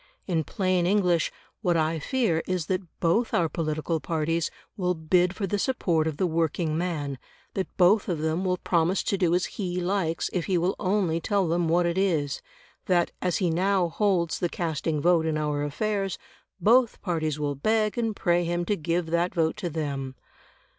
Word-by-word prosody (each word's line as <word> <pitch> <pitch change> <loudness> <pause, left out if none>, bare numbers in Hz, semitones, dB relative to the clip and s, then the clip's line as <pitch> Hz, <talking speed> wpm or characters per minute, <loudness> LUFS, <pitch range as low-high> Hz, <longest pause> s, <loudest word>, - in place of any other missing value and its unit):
In 165 -4 0
plain 185 0 0
English, 180 -4 +2 0.3
what 175 -5 +2
I 160 0 +1
fear 185 - +1
is 185 -3 -1
that 185 +3 -1 0.2
both 185 +8 +1
our 170 - +3
political 155 0 -2
parties 165 +2 -1 0.3
will 180 -2 0
bid 175 +3 +2
for 200 - -2
the 205 +2 -1
support 175 - +1
of 155 -2 -3
the 185 - +1
working 165 -1 0
man; 155 -6 -2 0.3
that 190 - -2
both 195 +3 +4
of 175 - 0
them 160 +4 -1
will 180 -1 +1
promise 175 +1 +1
to - - 0
do 175 -3 +2
as 180 - +1
he 180 -3 -3
likes 180 -3 0
if 180 -3 -1
he 190 -3 +2
will 175 +3 +1
only 185 -4 +1
tell 200 -1 +1
them 170 +1 +1
what 175 +2 +3
it 170 +2 0
is; 155 -8 0 0.5
that, 175 -3 +2
as 180 -2 +1
he 180 -4 +1
now 185 +1 +2
holds 180 -3 +1
the 175 - 0
casting 160 -2 -2
vote 165 0 +3
in 155 -1 0
our 150 -1 -1
affairs, 195 +5 -1 0.4
both 235 +5 +4
parties 155 -5 -1
will 145 -1 -1
beg 215 +9 +1
and 225 -3 -1
pray 175 -2 +2
him 175 +1 -1
to 205 - +1
give 170 0 -1
that 170 +1 +1
vote 160 -2 +1
to 175 - -3
them. 140 -4 -3
175 Hz, 190 wpm, -26 LUFS, 160-185 Hz, 0.5 s, both